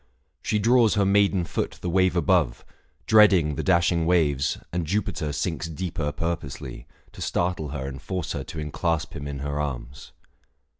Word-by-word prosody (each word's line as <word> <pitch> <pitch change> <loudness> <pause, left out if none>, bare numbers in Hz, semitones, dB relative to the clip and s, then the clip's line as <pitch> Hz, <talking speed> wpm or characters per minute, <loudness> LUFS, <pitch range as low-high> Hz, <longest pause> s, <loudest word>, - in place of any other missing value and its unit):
She 105 - 0
draws 115 +1 +4
her 100 -1 +3
maiden 100 -2 +3
foot - - -3
the - - -5
wave 95 0 +3
above, 85 -8 +1 0.4
Dreading 100 -8 +5
the - - -3
dashing 85 -2 +2
waves, 75 -6 +2 0.2
and 85 -2 -2
Jupiter 90 -5 -1
Sinks 80 +3 -3
deeper 80 -2 -3
purposely, 80 -2 -5 0.2
to - - -12
startle 90 -4 -1
her 70 -1 -4
And 65 0 -7
force 90 0 -4
her - - -3
to 80 - -7
enclasp 80 +2 -2
him 70 - -5
in 70 -1 -5
her 70 0 -2
arms. 70 -2 -6
85 Hz, 160 wpm, -25 LUFS, 75-95 Hz, 0.4 s, Dreading